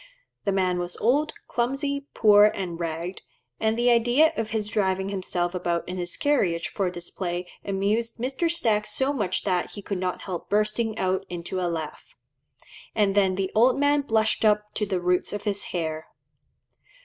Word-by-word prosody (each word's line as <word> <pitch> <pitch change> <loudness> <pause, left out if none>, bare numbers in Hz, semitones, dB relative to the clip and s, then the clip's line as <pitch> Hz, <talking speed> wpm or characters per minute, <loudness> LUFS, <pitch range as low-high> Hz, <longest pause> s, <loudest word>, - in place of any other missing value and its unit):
The 200 - +2
man 185 -2 +1
was 175 0 -3
old, 285 +7 +2 0.2
clumsy, 280 +3 -2
poor, 210 -1 +7
and 185 -5 -1
ragged, 170 +2 -4 0.4
and 220 +1 +1
the 240 +1 +4
idea 240 +7 +4
of 225 -1 -2
his 215 -2 -2
driving 190 -3 0
himself 185 -2 -1
about 175 -2 -1
in 180 +1 -4
his 175 -1 -3
carriage 185 - +1
for 195 -3 -1
display 175 0 -4 0.2
amused 205 +4 -1
Mr. 265 +8 -1
Stack 225 -11 +1
so 265 +6 +2
much 205 -9 -1
that 180 -3 0
he 205 - -8
could 195 -2 -3
not 180 -1 -3
help 175 -2 -6
bursting 215 +2 +1
out 190 -1 0
into 180 +1 -4
a 175 - 0
laugh; 165 - -6 0.8
and 205 -3 +3
then 195 -2 +3
"the 190 0 -2
old 245 +4 +4
man 285 +1 +3
blushed 220 -5 +1
up 210 -1 +2
to 210 - -1
the 190 -2 -1
roots 180 +2 +1
of 205 - -4
his 200 -1 -2
hair." 160 -3 -3
200 Hz, 175 wpm, -25 LUFS, 180-225 Hz, 0.8 s, poor